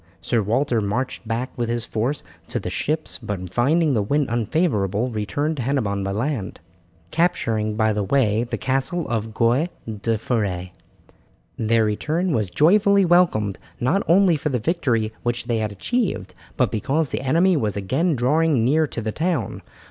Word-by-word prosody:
Sir 120 -2 0
Walter 115 +3 +1
marched 115 +3 -3
back 115 +3 -2
with 120 -1 -2
his 120 0 0
force 120 +7 -2 0.2
to - - -2
the - - -5
ships, 155 +1 -2
but 95 -6 -5
finding 150 - +2
the 110 - +2
wind 140 +7 0
unfavourable 120 - 0
returned 115 +9 -2
to - - -2
Hennebon 115 -7 -1
by 95 - -2
land, 115 0 -3 0.5
capturing 115 -11 0
by 110 0 +2
the 105 - -1
way 110 0 +2
the 120 - -4
castle 135 +6 -1
of 110 -1 -3
Goy 125 +9 +2 0.2
la 110 +1 -2
Foret. 100 -6 -2 0.9
Their 115 0 +2
return 155 - -1
was 110 -5 0
joyfully 200 - +4
welcomed, 165 - +3 0.2
not 130 +11 +2
only 180 0 +5
for 150 +1 -2
the 130 - 0
victory 115 -5 0
which 120 0 -2
they 115 -2 0
had 110 -1 -2
achieved, 230 - -2 0.2
but - - +2
because 135 +7 0
the - - -3
enemy 170 +8 +3
was 110 -9 -1
again 140 - 0
drawing 135 0 +2
near 155 +4 +3
to 120 - -5
the 110 -1 -2
town. 160 - -2
120 Hz, 165 wpm, -22 LUFS, 110-155 Hz, 0.9 s, only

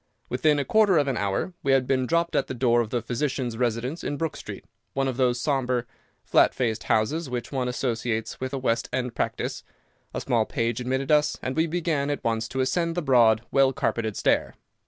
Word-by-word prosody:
Within 150 +4 +2
a 140 - -1
quarter 205 +1 +4
of 145 -2 +2
an 135 - 0
hour 100 - -1
we 135 - +2
had 135 -1 +3
been 130 -1 +1
dropped 170 +2 +1
at - - +1
the 130 - -5
door 120 -1 +3
of 115 - -3
the 120 -1 -2
physician's 125 0 -2
residence 125 +6 -2
in 145 - -2
Brook 165 0 -2
Street, - - -8 0.3
one 135 0 0
of 130 - -2
those 125 -1 +1
sombre, 125 -3 0 0.4
flat - - +4
faced 115 -3 -1
houses 135 +8 +1
which 125 -1 -4
one 130 -3 -1
associates 120 -3 -2
with 130 0 -3
a 140 - -2
West 115 -3 0
End 125 -2 -2
practice. - - -3 0.5
A - - -3
small 115 -3 +1
page 115 0 -1
admitted 130 +3 -1
us, 150 0 +3
and 130 +1 -2
we 160 +1 +2
began 160 -4 -1
at 145 - -3
once 115 0 0
to 130 +2 -2
ascend 165 +5 0
the 175 - -1
broad, 115 -5 +4
well 135 -1 +4
carpeted 110 -3 -1
stair. - - +1
130 Hz, 210 wpm, -25 LUFS, 120-145 Hz, 0.5 s, quarter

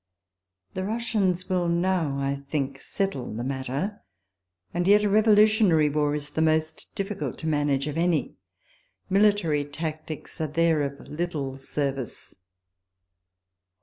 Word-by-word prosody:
The 185 - -3
Russians 205 -4 0
will 180 -2 +1
now,f 170 -4 +1
I 140 0 -2
think, 135 -2 -2
settle 195 -11 -2
the 120 - -3
matter; 135 - -3 0.7
and 175 +1 0
yet 205 +1 +6
a 205 - +2
revolutionary 210 -6 +5
war 150 0 +1
is 145 0 -4
the 160 - -1
most 160 0 0
difficult 200 0 -3
to 160 - -5
manage 145 -3 +1
of 150 +1 -3
any. 170 -3 +1 0.8
Military 195 -7 +3
tactics 155 +2 -6
are 155 - 0
there 160 +1 +2
of 140 0 -4
little 150 -4 -3
service. 135 -2 -4
160 Hz, 125 wpm, -26 LUFS, 145-190 Hz, 0.8 s, yet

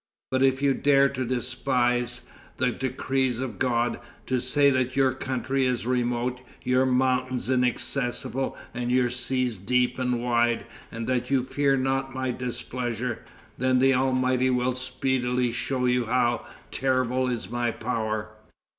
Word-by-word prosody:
But 130 0 +1
if 135 +1 +3
you 140 -1 +4
dare 140 0 +4
to 130 -2 -3
despise 125 0 0 0.4
the 125 0 +2
decrees 130 -1 -1
of 125 -6 -4
God, 120 -2 +1
and - - -18 0.2
to 130 -1 0
say 140 +3 +4
that 130 -1 0
your 135 -1 +4
country 130 +1 -1
is 125 -2 -1
remote, 125 0 -1 0.2
your 130 +1 +2
mountains 130 0 +1
inaccessible, 125 +1 0 0.2
and 120 0 -3
your 125 -1 +3
seas 125 -3 0
deep 125 +5 +1
and 125 -1 0
wide, 120 -1 +1 0.3
and 115 0 -5
that 125 0 -1
you 135 -2 +2
fear 140 +1 +1
not 135 0 -1
my 130 -1 -1
displeasure, 125 -1 -3 0.4
then 130 0 +3
the 135 +1 +4
Almighty 130 0 +2
will 125 0 +1
speedily 125 -1 0
show 125 +2 -1
you 125 -1 +2
how 120 -1 +1 0.2
terrible 130 -1 +1
is 115 -5 -3
my 120 0 0
power." 110 -2 -3
125 Hz, 145 wpm, -26 LUFS, 120-130 Hz, 0.4 s, you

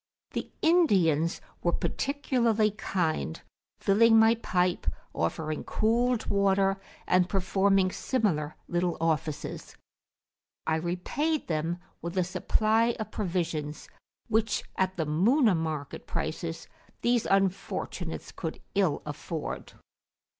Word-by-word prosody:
The - - -4
Indians 185 - +3 0.2
were 175 - +1
particularly 235 -6 +1
kind, 170 - -1 0.4
filling 225 +3 +5
my 225 +1 +7
pipe, 180 -6 0 0.3
offering 155 - -2
cooled 235 +2 +1
water, 195 -1 +2 0.2
and 180 0 +3
performing 195 0 +2
similar 180 - 0
little 175 0 0
offices. 160 -2 -2 0.9
I 160 0 +2
repaid 185 - -1
them 165 +1 -1 0.2
with 170 +2 -5
a 185 - +4
supply 220 +6 +2
of 220 - -4
provisions, 165 -6 -2
[p.222] - - -21 0.4
which, 220 0 +1
at 190 0 0
the 160 - 0
Muna 210 - +4
market 155 -3 -4
prices, 165 +1 -4 0.3
these 240 -1 +2
unfortunates 195 -1 -1
could - - -5
ill 190 -7 +1
afford. 150 +1 -5
190 Hz, 105 wpm, -28 LUFS, 165-220 Hz, 0.9 s, my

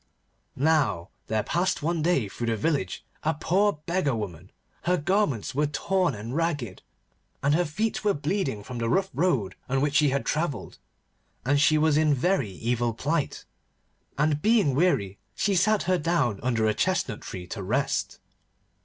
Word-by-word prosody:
Now 135 - +1 0.2
there 110 -1 0
passed 180 -2 0
one 165 +1 0
day 155 - +2
through 120 +4 -5
the 115 - +1
village 125 - -1 0.2
a 160 0 0
poor 200 +7 +2
beggar 170 -7 0
woman. 95 -4 -6 0.3
Her 180 +1 +3
garments 155 - 0
were 150 +2 +1
torn 180 +1 0
and 110 +5 -6
ragged, 145 - -2 0.6
and 140 +1 +3
her 175 +3 +2
feet 210 +10 -2
were 205 -1 +2
bleeding 145 - -2
from 125 +2 -6
the 115 0 -1
rough 190 +8 +1
road 130 - +1 0.2
on 135 +1 +1
which 145 +1 0
she 150 -1 +4
had 135 +1 -1
travelled, 155 -3 -2 0.7
and 140 +2 +3
she 155 +1 +5
was 155 -1 +3
in 155 -2 +3
very 140 - +1
evil 115 +3 -1
plight. 150 +5 -2 0.7
And 150 0 +1
being 215 - +3
weary 130 - +1 0.2
she 200 - +1
sat 205 +3 +3
her 185 0 +1
down 145 - +1
under 115 -3 +1
a 110 - +2
chestnut 155 - -1
tree 90 -1 -7
to 105 - -5
rest. 125 +9 -1
145 Hz, 165 wpm, -26 LUFS, 115-175 Hz, 0.7 s, she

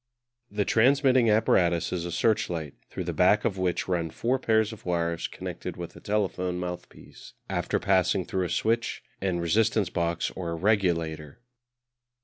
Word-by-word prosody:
The 105 -1 -1
transmitting 130 0 +4
apparatus 90 -6 +2
is 85 -2 -2
a 85 - -4
searchlight, 85 -7 0 0.2
through - - -5
the - - -3
back 100 +3 +3
of 95 -3 -1
which 90 -2 -1
run 85 -3 -1
four 125 +10 -1
pairs 110 -2 +2
of 110 - -12
wires 85 -1 -1
connected - - -7
with - - -7
a - - -11
telephone 95 -3 -1
mouthpiece 90 0 -8
after - - -1
passing 95 -1 +2
through 95 -1 -1
a - - -4
switch 115 +6 0 0.2
and 95 -2 0
resistance 100 +2 +1
box 85 -1 -1
or 85 -3 -4
regulator. 85 -6 0
95 Hz, 150 wpm, -27 LUFS, 85-110 Hz, 0.2 s, transmitting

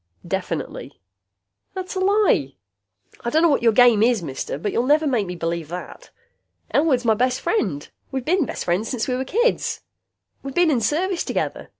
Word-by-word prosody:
"Definitely." - - -4 0.8
"That's 375 0 -5
a 380 - -2
lie! 380 - +2 0.7
I 235 - -1
don't 315 +6 +2
know 340 - +5
what 285 - +2
your 230 -1 +4
game 240 -2 +5
is, 230 -4 +3
mister, 135 -2 -4
but 200 +7 -3
you'll - - +1
never 305 +2 +4
make 240 -9 0
me 180 - -5
believe 170 -1 -3
that. 180 - -8 0.6
Elwood's 280 -5 +2
my 225 - +5
best 250 +3 0
friend. 195 - -1 0.2
We 265 -1 -2
been 330 +3 +1
best - - -5
friends 180 +6 0
since 245 -4 -2
we 255 - -1
was 260 +1 -2
kids. 475 - 0 0.6
We 275 0 -7
been 350 0 +3
in 250 -5 +1
service 340 - 0
together. - - -3
250 Hz, 185 wpm, -22 LUFS, 205-330 Hz, 0.8 s, know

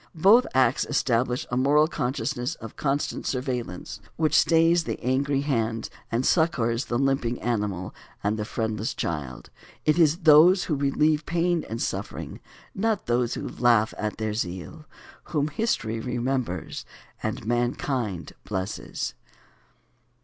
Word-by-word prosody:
Both 205 +10 +6
acts 130 -1 +3
establish 125 -3 0
a 125 - 0
moral 145 +4 +4
consciousness 130 -1 -2
of 115 - -10
constant 140 0 -1
surveillance, 125 -7 -3 0.2
which 155 -1 +1
stays 165 0 +4
the - - -3
angry 135 +2 +1
hand 115 -5 -1 0.2
and 120 +3 0
succors 125 -8 +2
the 120 - -1
limping 135 -3 0
animal 105 -6 -2 0.3
and 105 +1 +1
the 105 - -3
friendless 110 -1 -2
child. 70 -6 -4 0.3
It 155 +2 +3
is 165 +2 +4
those 165 +4 +7
who 160 - -2
relieve 150 +2 +1
pain 170 0 +1
and 115 - -4
suffering, - - -4 0.3
not 215 +1 0
those 120 0 +1
who - - -4
laugh 115 -3 +2
at 105 0 -3
their 110 -1 -2
zeal, 105 - -5 0.4
whom 150 -2 -1
history 140 - -1
remembers 125 - -2 0.4
and - - -3
mankind 120 - -1
blesses. 95 0 -4
125 Hz, 130 wpm, -26 LUFS, 115-150 Hz, 0.4 s, those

